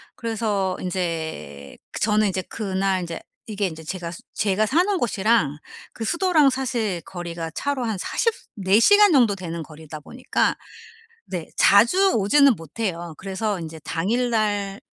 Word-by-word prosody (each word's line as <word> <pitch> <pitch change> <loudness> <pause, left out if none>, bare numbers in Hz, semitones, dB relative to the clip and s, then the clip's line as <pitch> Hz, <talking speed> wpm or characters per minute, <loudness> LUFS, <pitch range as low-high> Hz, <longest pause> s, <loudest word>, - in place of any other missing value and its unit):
그래서 210 -5 -1
인제 160 - -4 0.2
저는 215 0 +3
인제 190 -1 -1
그날 195 -3 -1
인제 170 -1 -5 0.3
이게 205 -3 -1
인제 160 -1 -8
제가 170 +1 -5 0.2
제가 210 +1 +1
사는 365 - +2
곳이랑 215 - +1 0.4
그 225 - -6
수도랑 335 - +3
사실 235 -8 -2
거리가 170 -2 -5
차로 275 +5 -2
한 220 -3 -2
40 460 - 0
시 - - -18
4 195 +2 +3
시간 410 - +6
정도 235 -8 +4
되는 170 -3 -6
거리다 155 0 -10
보니까 250 - -1 0.7
네 175 -3 -5
자주 360 - +5
오지는 265 +6 +5
못해요. 170 0 -5
그래서 195 +1 -2
인제 160 -1 -8
당일날 205 +1 -1
200 Hz, 275 characters per minute, -23 LUFS, 175-235 Hz, 0.7 s, 시간